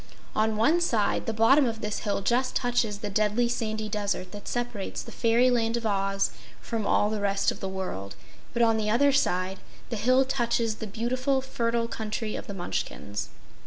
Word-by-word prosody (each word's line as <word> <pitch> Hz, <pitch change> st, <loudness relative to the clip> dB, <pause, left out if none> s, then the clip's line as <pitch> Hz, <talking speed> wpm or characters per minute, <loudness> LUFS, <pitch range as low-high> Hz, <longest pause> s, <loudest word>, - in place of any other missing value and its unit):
One 215 Hz, 0 st, +1 dB
one 310 Hz, +11 st, +3 dB
side, 225 Hz, -11 st, +1 dB
the -, -, +1 dB
bottom 245 Hz, +6 st, +5 dB
of 225 Hz, -1 st, -3 dB
this 210 Hz, 0 st, -2 dB
hill 205 Hz, -2 st, -1 dB
just 255 Hz, +4 st, +1 dB
touches 240 Hz, -4 st, +1 dB
the 210 Hz, -, -3 dB
Deadly 215 Hz, +4 st, +2 dB
Sandy 220 Hz, -3 st, -2 dB
Desert 205 Hz, -3 st, -2 dB
that 205 Hz, -1 st, -9 dB
separates 240 Hz, -5 st, -3 dB
the -, -, -10 dB
Fairyland 235 Hz, 0 st, +2 dB
of 235 Hz, -, -5 dB
Oz 195 Hz, -1 st, +1 dB, 0.3 s
from 225 Hz, -3 st, -3 dB
all 210 Hz, -, +3 dB
the 215 Hz, -1 st, -2 dB
rest 200 Hz, 0 st, +2 dB
of -, -, -8 dB
the 195 Hz, -, -3 dB
world, 140 Hz, -, -5 dB, 0.4 s
but 235 Hz, 0 st, +2 dB
on 225 Hz, -1 st, +4 dB
the 215 Hz, -1 st, 0 dB
other 280 Hz, +6 st, +4 dB
side, 190 Hz, -8 st, +1 dB, 0.3 s
the 230 Hz, -, -1 dB
hill 255 Hz, +5 st, +4 dB
touches 235 Hz, -4 st, 0 dB
the 220 Hz, -, -5 dB
beautiful, 255 Hz, +6 st, 0 dB
fertile 235 Hz, -3 st, -1 dB
Country 220 Hz, -1 st, -3 dB
of -, -, -6 dB
the 200 Hz, -, -5 dB
Munchkins. 105 Hz, -, -4 dB
220 Hz, 185 wpm, -27 LUFS, 205-240 Hz, 0.4 s, bottom